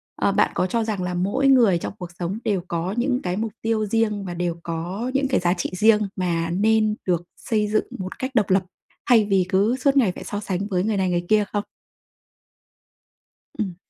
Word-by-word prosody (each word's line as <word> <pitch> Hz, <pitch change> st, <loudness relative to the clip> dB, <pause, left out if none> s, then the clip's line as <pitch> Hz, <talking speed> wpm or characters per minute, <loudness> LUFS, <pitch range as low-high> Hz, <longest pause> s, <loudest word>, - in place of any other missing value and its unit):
à, -, -, +1 dB
bạn -, -, +2 dB
có 185 Hz, -, 0 dB
cho 230 Hz, +4 st, 0 dB
rằng 210 Hz, -4 st, -2 dB
là 180 Hz, 0 st, -2 dB
mỗi 200 Hz, +10 st, +1 dB
người 240 Hz, -9 st, +5 dB
trong 170 Hz, -, -5 dB
cuộc 180 Hz, -1 st, -6 dB
sống 180 Hz, +5 st, -3 dB
đều 205 Hz, -5 st, 0 dB
có 170 Hz, +3 st, -2 dB
những 250 Hz, +1 st, +1 dB
cái 180 Hz, 0 st, -2 dB
mục 220 Hz, 0 st, -2 dB
tiêu 225 Hz, -1 st, 0 dB
riêng 210 Hz, -1 st, 0 dB
và 180 Hz, -, -4 dB
đều 175 Hz, -1 st, -2 dB
có 175 Hz, +9 st, -4 dB
những 275 Hz, 0 st, +1 dB
cái 260 Hz, -, +1 dB
giá 175 Hz, 0 st, +2 dB
trị 175 Hz, -, -3 dB
riêng 210 Hz, +3 st, +4 dB
mà 170 Hz, -3 st, -1 dB
nên 215 Hz, +4 st, +2 dB
được 175 Hz, -2 st, +1 dB
xây 215 Hz, -4 st, 0 dB
dựng 215 Hz, +1 st, +1 dB
một 185 Hz, 0 st, -6 dB
cách 260 Hz, +1 st, -3 dB
độc 210 Hz, -5 st, +2 dB
lập, 190 Hz, 0 st, +3 dB, 0.5 s
thay 225 Hz, -4 st, +6 dB
vì 195 Hz, -3 st, +2 dB
cứ 205 Hz, +6 st, +2 dB
suốt 275 Hz, +1 st, +2 dB
ngày 230 Hz, -9 st, +4 dB
phải -, -, -9 dB
so 205 Hz, -, -4 dB
sánh 200 Hz, -1 st, -3 dB
với 185 Hz, -3 st, 0 dB
người 215 Hz, 0 st, 0 dB
này 190 Hz, -1 st, +1 dB
người 175 Hz, 0 st, -1 dB
kia 215 Hz, -1 st, +4 dB
không? 205 Hz, -1 st, 0 dB, 2.0 s
Ừm. 195 Hz, -5 st, -2 dB
205 Hz, 215 wpm, -23 LUFS, 180-225 Hz, 2.0 s, thay